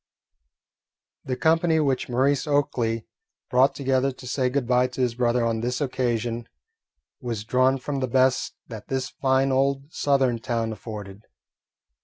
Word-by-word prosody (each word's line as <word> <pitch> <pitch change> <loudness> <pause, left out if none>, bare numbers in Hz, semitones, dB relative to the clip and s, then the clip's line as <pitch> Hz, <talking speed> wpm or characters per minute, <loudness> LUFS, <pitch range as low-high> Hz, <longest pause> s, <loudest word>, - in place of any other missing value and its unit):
The 130 - -2
company 160 +2 +2
which 135 -5 0
Maurice 135 +4 +1
Oakley 120 -6 0 0.5
brought 130 +2 +4
together 135 0 +1
to 130 0 -12
say 125 +1 0
good 135 0 -1
bye 125 +1 +3
to 125 +1 -5
his 125 -2 +1
brother 120 0 +1
on 115 -1 0
this 125 +1 -1
occasion 120 -4 -1 0.7
was 115 -4 -4
drawn 130 +3 +2
from 140 +1 -4
the 130 - -1
best 130 +1 +2
that 110 -3 -9
this 130 -1 -2
fine 135 0 +1
old 135 +2 0
Southern 135 -4 +2
town 115 -1 -2
afforded. 105 -2 -9
130 Hz, 145 wpm, -25 LUFS, 120-135 Hz, 0.7 s, brought